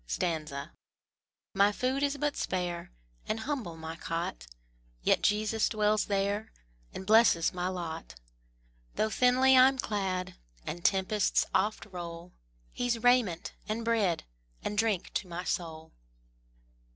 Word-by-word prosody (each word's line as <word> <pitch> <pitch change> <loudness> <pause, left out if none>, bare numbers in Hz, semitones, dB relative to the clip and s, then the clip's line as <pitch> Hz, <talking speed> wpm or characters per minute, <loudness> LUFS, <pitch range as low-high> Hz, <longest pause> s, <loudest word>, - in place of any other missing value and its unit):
My 200 +1 +4
food 255 +5 -1
is 285 0 +1
but 295 +1 -1
spare, 175 - -3 0.4
And 220 +1 -1
humble 225 - -3
my 160 0 -6
cot, 165 - -4 0.6
Yet - - +3
Jesus 215 +1 +2
dwells 215 0 +2
there 200 +2 -1 0.4
And 190 - -7
blesses 215 -6 +5
my 180 0 -2
lot: 165 - -5 0.8
Though 220 - +1
thinly 255 +2 +5
I'm 260 +1 +6
clad, 195 -6 -2 0.3
And 175 +2 -5
tempests 195 +1 +2
oft 215 +1 +1
roll, 175 -2 -8 0.4
He's 240 -2 -1
raiment, 245 -9 +3 0.2
and 225 +2 -2
bread, 210 -7 +1 0.4
And 210 - -2
drink 210 -4 0
to 190 - -2
my 175 +1 -5
soul. 160 -3 -4
205 Hz, 120 wpm, -30 LUFS, 175-230 Hz, 0.8 s, I'm